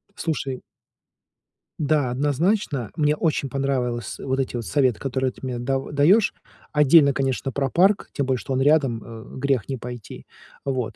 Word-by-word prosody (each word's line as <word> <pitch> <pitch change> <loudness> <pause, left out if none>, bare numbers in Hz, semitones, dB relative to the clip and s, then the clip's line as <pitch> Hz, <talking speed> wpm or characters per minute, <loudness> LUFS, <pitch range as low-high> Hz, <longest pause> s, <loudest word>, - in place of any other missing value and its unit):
Слушай 145 -9 -3 1.2
Да, 145 -3 +1
однозначно, 145 - 0
мне 150 -1 +2
очень 145 -4 0
понравилось 125 -3 -2
вот 135 0 -2
эти 130 -2 -2
вот 120 -2 -3
советы, 130 -6 +2
которые 130 -1 -1
ты - - -18
мне 125 -2 -3
дав 135 +3 -2
даёшь. 170 +10 +4 0.4
Отдельно, 150 0 +6
конечно, 135 0 -1
про 135 0 -1
парк, 190 +6 +3
тем 140 - -1
более 130 -1 +1
что 135 - -4
он 130 - +1
рядом, 135 -6 +3
э 115 0 -11
э - - -7
грех 135 -4 0
не 135 - -2
пойти. 120 -2 -9 0.4
Вот. 130 -4 -2
135 Hz, 165 wpm, -23 LUFS, 125-150 Hz, 1.2 s, Отдельно